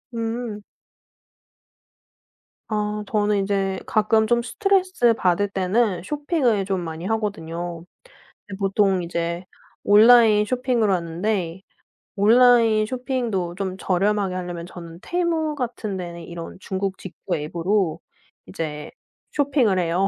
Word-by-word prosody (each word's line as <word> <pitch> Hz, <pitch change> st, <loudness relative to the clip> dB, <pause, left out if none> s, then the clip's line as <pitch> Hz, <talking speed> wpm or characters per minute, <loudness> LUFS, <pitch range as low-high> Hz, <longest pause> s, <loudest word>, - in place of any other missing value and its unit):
음. 225 Hz, -2 st, -4 dB, 2.1 s
아 210 Hz, 0 st, -2 dB
저는 210 Hz, -2 st, +1 dB
이제 195 Hz, -1 st, -1 dB
가끔 220 Hz, 0 st, +2 dB
좀 235 Hz, +2 st, +2 dB
스트레스 370 Hz, -, +2 dB
받을 200 Hz, -1 st, +1 dB
때는 195 Hz, +1 st, 0 dB
쇼핑을 285 Hz, -, 0 dB
좀 190 Hz, -1 st, -1 dB
많이 165 Hz, 0 st, -6 dB
하거든요. 175 Hz, -6 st, -3 dB, 0.8 s
보통 195 Hz, -1 st, +2 dB
이제 170 Hz, +1 st, -3 dB, 0.4 s
온라인 215 Hz, 0 st, +6 dB
쇼핑을 250 Hz, -3 st, 0 dB
하는데 175 Hz, +1 st, -2 dB, 0.5 s
온라인 225 Hz, 0 st, +5 dB
쇼핑도 235 Hz, -8 st, -2 dB
좀 190 Hz, -1 st, -4 dB
저렴하게 195 Hz, 0 st, 0 dB
하려면 175 Hz, -2 st, -5 dB
저는 170 Hz, -2 st, -10 dB
Temu 330 Hz, -3 st, -1 dB
같은 235 Hz, -7 st, -4 dB
데는 170 Hz, -1 st, -7 dB
이런 170 Hz, +1 st, -8 dB
중국 190 Hz, 0 st, -3 dB
직구 190 Hz, 0 st, -5 dB
앱으로 170 Hz, +3 st, -1 dB, 0.5 s
이제 150 Hz, -, -5 dB, 0.4 s
쇼핑을 270 Hz, -9 st, +2 dB
해요. 180 Hz, +3 st, +1 dB
205 Hz, 240 characters per minute, -23 LUFS, 180-230 Hz, 2.1 s, 온라인